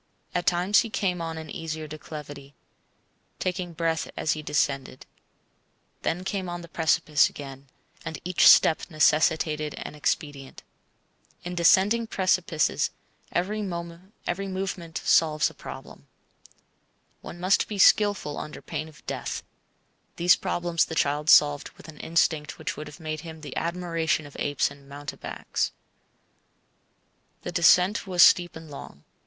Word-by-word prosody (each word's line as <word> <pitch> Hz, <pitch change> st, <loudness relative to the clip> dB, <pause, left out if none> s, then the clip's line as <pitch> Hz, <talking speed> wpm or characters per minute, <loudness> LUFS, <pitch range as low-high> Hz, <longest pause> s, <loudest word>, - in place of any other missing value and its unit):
At 175 Hz, -, -2 dB
times 180 Hz, +4 st, +4 dB
he 230 Hz, -, -1 dB
came 185 Hz, -4 st, -1 dB
on 165 Hz, -1 st, -4 dB
an 160 Hz, -1 st, -8 dB
easier 160 Hz, -1 st, -5 dB
declivity, 145 Hz, -2 st, -9 dB, 0.8 s
taking 180 Hz, -1 st, -3 dB
breath 165 Hz, 0 st, -1 dB
as 155 Hz, -, 0 dB
he 155 Hz, -, -5 dB
descended; 140 Hz, -3 st, -1 dB, 1.0 s
then 175 Hz, +3 st, -2 dB
came 190 Hz, -1 st, -3 dB
on 175 Hz, 0 st, -5 dB
the 170 Hz, -, -10 dB
precipice 160 Hz, -2 st, +2 dB
again, 135 Hz, -1 st, -10 dB, 0.4 s
and 160 Hz, -, -5 dB
each 180 Hz, 0 st, +4 dB
step 160 Hz, -, +7 dB
necessitated 155 Hz, -1 st, +2 dB
an -, -, -7 dB
expedient. 145 Hz, -2 st, -3 dB, 0.8 s
In 175 Hz, -, -5 dB
descending 195 Hz, +6 st, +4 dB
precipices, 185 Hz, -6 st, +1 dB, 0.4 s
every 205 Hz, +5 st, -1 dB
movement 185 Hz, 0 st, -5 dB
solves 155 Hz, -3 st, +3 dB
a -, -, -17 dB
problem. -, -, -11 dB, 1.1 s
One 175 Hz, -, -9 dB
must 185 Hz, +3 st, +2 dB
be 210 Hz, -, -5 dB
skilful 200 Hz, -6 st, +4 dB
under 150 Hz, -, -7 dB
pain 155 Hz, -, -4 dB
of 150 Hz, -3 st, -19 dB
death. -, -, -4 dB, 0.7 s
These 175 Hz, +1 st, +5 dB
problems 170 Hz, -1 st, 0 dB
the 160 Hz, -, -6 dB
child 150 Hz, +1 st, 0 dB
solved 145 Hz, -1 st, +5 dB
with -, -, -14 dB
an 155 Hz, -2 st, -12 dB
instinct 160 Hz, -2 st, 0 dB
which -, -, -4 dB
would 150 Hz, -, -7 dB
have 150 Hz, -, -12 dB
made 155 Hz, -1 st, -4 dB
him 160 Hz, -2 st, -10 dB
the 145 Hz, -3 st, -8 dB
admiration 165 Hz, -2 st, -1 dB
of 145 Hz, -, -13 dB
apes 145 Hz, -1 st, 0 dB
and 140 Hz, 0 st, -15 dB
mountebanks. 145 Hz, 0 st, -4 dB, 1.7 s
The 175 Hz, -, -4 dB
descent 180 Hz, +3 st, +4 dB
was 180 Hz, -2 st, +5 dB
steep 175 Hz, -1 st, +5 dB
and 160 Hz, -2 st, -10 dB
long. 75 Hz, -, -10 dB
165 Hz, 135 wpm, -26 LUFS, 150-180 Hz, 1.7 s, step